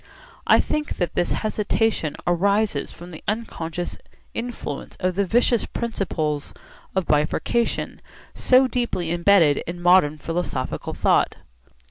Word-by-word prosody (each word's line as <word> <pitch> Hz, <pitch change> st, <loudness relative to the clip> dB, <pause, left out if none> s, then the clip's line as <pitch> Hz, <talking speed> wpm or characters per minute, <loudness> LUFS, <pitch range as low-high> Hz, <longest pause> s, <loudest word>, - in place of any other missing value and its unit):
I -, -, +6 dB
think 300 Hz, 0 st, -2 dB
that 175 Hz, -, -1 dB
this 175 Hz, -, 0 dB
hesitation 215 Hz, -6 st, 0 dB
arises 200 Hz, -1 st, +1 dB
from 175 Hz, +1 st, -11 dB
the 160 Hz, -, -10 dB
unconscious 175 Hz, -6 st, -3 dB, 0.3 s
influence 230 Hz, -, -5 dB
of 185 Hz, 0 st, 0 dB
the 200 Hz, +1 st, 0 dB
vicious 240 Hz, +2 st, +2 dB
principle 165 Hz, -10 st, -2 dB, 0.5 s
of 190 Hz, -2 st, +1 dB
bifurcation, 155 Hz, +11 st, 0 dB, 0.3 s
so 255 Hz, +1 st, +4 dB
deeply 235 Hz, -10 st, -2 dB
embedded 170 Hz, -4 st, +4 dB
in 175 Hz, +1 st, -5 dB
modern 175 Hz, -4 st, +4 dB
philosophical 165 Hz, -5 st, -3 dB
thought. -, -, +2 dB
180 Hz, 115 wpm, -23 LUFS, 165-220 Hz, 0.5 s, I